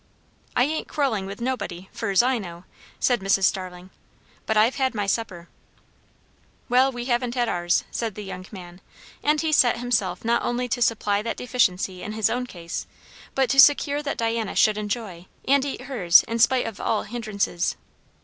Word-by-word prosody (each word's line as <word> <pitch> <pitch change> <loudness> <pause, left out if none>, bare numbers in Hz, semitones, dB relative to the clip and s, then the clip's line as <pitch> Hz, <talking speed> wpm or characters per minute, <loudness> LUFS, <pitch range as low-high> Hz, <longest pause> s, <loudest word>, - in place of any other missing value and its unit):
"I 245 - +4
ain't 310 +4 -2
quarrelling 240 -10 -1
with 200 +1 -8
nobody 200 -8 -4
fur's 225 -3 +1
I 255 -1 +1
know," 175 -3 -9 0.4
said 245 -2 +2
Mrs. 195 0 +1
Starling; 185 -1 -1 0.6
"but 220 - +1
I've 225 +4 +3
had 260 -3 0
my 205 -2 -1
supper." 190 -5 -3 1.2
"Well, 255 +2 +4
we 245 -1 -6
haven't 245 -1 -1
had 240 -1 +1
ours," 175 -4 +1
said 225 -4 -3
the 210 - -7
young 185 -1 -8
man; 180 -2 -11 0.4
and 300 +1 +2
he 320 0 0
set 245 -6 +4
himself 245 -1 -1
not 235 +1 +2
only 245 +1 -1
to 245 +1 -2
supply 210 -3 +1
that 230 +2 -4
deficiency 190 -7 0
in 215 - -5
his 215 -2 +1
own 250 +1 -2
case, 170 -5 -6 0.5
but 265 -1 +2
to 275 - +2
secure 290 +1 +5
that 285 -1 -4
Diana 225 -2 -1
should 215 -1 +3
enjoy 205 -5 -5 0.2
and 275 0 +4
eat 280 - -4
hers 190 -11 +4
in 230 0 -4
spite 250 +2 +4
of 220 -3 -6
all 220 - 0
hindrances. 210 -6 -2
225 Hz, 180 wpm, -24 LUFS, 195-250 Hz, 1.2 s, secure